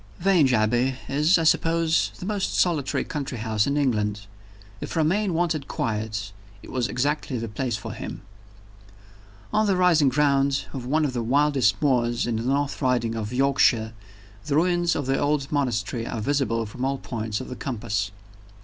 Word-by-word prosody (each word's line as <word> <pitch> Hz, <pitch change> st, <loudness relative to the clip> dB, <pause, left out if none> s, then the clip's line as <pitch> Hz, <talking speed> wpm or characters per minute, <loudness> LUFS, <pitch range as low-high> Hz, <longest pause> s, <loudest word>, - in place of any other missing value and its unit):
VII. -, -, -13 dB
VANGE 170 Hz, -9 st, +4 dB
ABBEY 120 Hz, +4 st, +2 dB
is, 150 Hz, +6 st, +3 dB
I 165 Hz, -, 0 dB
suppose, 165 Hz, 0 st, +2 dB
the -, -, -7 dB
most 205 Hz, -1 st, -2 dB
solitary 155 Hz, -7 st, +1 dB
country 140 Hz, -4 st, -5 dB
house 110 Hz, 0 st, 0 dB
in 140 Hz, +1 st, 0 dB
England. 105 Hz, -7 st, 0 dB, 0.6 s
If -, -, -6 dB
Romayne 175 Hz, +4 st, +1 dB
wanted 160 Hz, -4 st, 0 dB
quiet, 110 Hz, -6 st, -3 dB, 0.3 s
it -, -, -11 dB
was 125 Hz, -2 st, 0 dB
exactly 140 Hz, 0 st, -1 dB
the 115 Hz, 0 st, -4 dB
place 120 Hz, +1 st, -2 dB
for 110 Hz, -, -7 dB
him. -, -, -7 dB, 1.3 s
On 215 Hz, 0 st, +3 dB
the 195 Hz, -, +3 dB
rising 170 Hz, -6 st, +4 dB
ground 140 Hz, 0 st, +2 dB
of 125 Hz, -3 st, -5 dB
one 155 Hz, +3 st, +2 dB
of 135 Hz, -, -2 dB
the 120 Hz, -, -1 dB
wildest 130 Hz, -5 st, +2 dB
moors 120 Hz, -4 st, +2 dB
in 115 Hz, -2 st, -1 dB
the -, -, -2 dB
North 140 Hz, +4 st, -1 dB
Riding 125 Hz, -4 st, +1 dB
of 110 Hz, -1 st, -4 dB
Yorkshire, 125 Hz, -4 st, +2 dB, 0.5 s
the 145 Hz, -2 st, -1 dB
ruins 175 Hz, +1 st, +2 dB
of 145 Hz, -, -2 dB
the 135 Hz, +1 st, 0 dB
old 145 Hz, -1 st, 0 dB
monastery 120 Hz, -4 st, -1 dB
are -, -, -4 dB
visible 120 Hz, -2 st, 0 dB
from 125 Hz, +4 st, -7 dB
all 135 Hz, +1 st, 0 dB
points 110 Hz, -4 st, -4 dB
of 130 Hz, -, -7 dB
the 125 Hz, -, -6 dB
compass. 105 Hz, -7 st, -3 dB
135 Hz, 175 wpm, -24 LUFS, 115-150 Hz, 1.3 s, VANGE